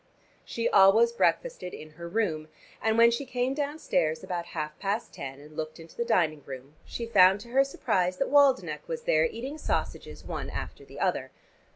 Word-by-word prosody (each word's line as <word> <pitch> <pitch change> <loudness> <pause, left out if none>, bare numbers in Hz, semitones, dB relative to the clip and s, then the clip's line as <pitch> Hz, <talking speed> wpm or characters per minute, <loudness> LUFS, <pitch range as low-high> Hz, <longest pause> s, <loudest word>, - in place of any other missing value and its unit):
She 230 - -2
always 205 +4 +6
breakfasted 235 - 0
in 155 0 -11
her 170 +2 -9
room, 170 -7 -1 0.3
and 220 0 +1
when 235 0 +7
she 235 +4 -2
came 255 0 -1
downstairs 280 - -1
about 175 -1 -4
half 150 -1 -4
past 205 +3 -2
ten, 135 0 -7
and 150 +1 -14
looked 155 +1 -5
into 165 0 -13
the 235 - -1
dining 155 -9 +1
room, 135 +1 -9
she 235 - -5
found 195 -3 +5
to 235 - -12
her 270 +3 +4
surprise 185 -9 -1
that 275 - -1
Waldenech 280 -2 +3
was 480 -1 -4
there - - +3
eating 285 - -5
sausages - - -3
one - - -5
after - - -6
the - - -12
other. - - 0
205 Hz, 185 wpm, -28 LUFS, 160-260 Hz, 0.3 s, when